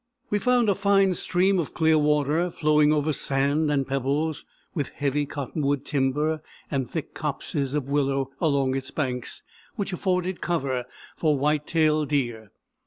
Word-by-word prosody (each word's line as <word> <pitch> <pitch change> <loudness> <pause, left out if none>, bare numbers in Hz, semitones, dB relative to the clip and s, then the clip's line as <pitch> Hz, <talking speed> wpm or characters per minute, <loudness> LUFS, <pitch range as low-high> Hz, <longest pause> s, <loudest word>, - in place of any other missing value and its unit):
We 205 - +2
found 245 0 +3
a 200 - +4
fine 195 -1 +3
stream 185 +2 +2
of 160 - -4
clear 160 -1 +4
water, 150 +3 +2
flowing 150 -2 +3
over 155 0 +1
sand 140 +3 +1
and 140 -2 +1
pebbles, 140 +4 -1 0.3
with 145 -5 -2
heavy 145 0 -1
cottonwood 140 0 -2
timber 150 +3 0 0.3
and 135 -4 -1
thick 160 -4 -5
copses 145 -1 -2
of 145 -3 -1
willow 135 -1 0
along 140 -4 +2
its 130 -1 -3
banks, 125 -5 -3 0.3
which 200 -4 -3
afforded 180 0 -1
cover 135 -7 -1 0.3
for 155 -3 +2
white 150 +2 +1
tailed 155 -3 +2
deer. 120 -7 -1
150 Hz, 150 wpm, -25 LUFS, 135-160 Hz, 0.3 s, a